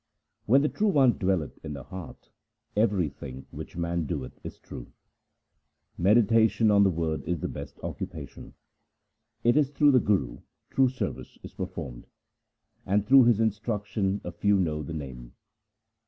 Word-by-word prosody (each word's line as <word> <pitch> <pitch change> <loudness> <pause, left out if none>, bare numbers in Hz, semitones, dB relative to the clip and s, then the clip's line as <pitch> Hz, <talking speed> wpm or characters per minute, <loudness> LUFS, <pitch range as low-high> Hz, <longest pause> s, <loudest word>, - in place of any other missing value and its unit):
When 135 +6 +5
the - - +3
True 215 +7 0
One 135 - +4
dwelleth 95 -6 -1
in 80 -2 -5
the 70 - -7
heart, 95 -4 -10 0.4
everything 85 - -1
which - - -9
man 85 -1 -1
doeth 70 -7 -5
is - - -8
true. - - -10 1.0
Meditation 110 +1 +4
on 100 -1 +5
the 100 - +4
Word 80 -2 -2
is 90 -2 -1
the - - -1
best - - -8
occupation. - - -7 0.9
It 120 +2 +4
is 150 -3 +3
through 145 0 +4
the 130 - +5
Guru 105 -3 0 0.3
true 135 -1 +4
service 130 - -5
is - - -10
performed, - - -6 0.8
And 100 +2 +1
through 130 +2 +7
his 115 -3 +4
instruction 105 -2 -1
a 90 - -5
few 100 +4 +2
know 75 -4 0
the 80 +2 -6
Name. 65 -5 -8
100 Hz, 150 wpm, -27 LUFS, 80-115 Hz, 1.0 s, through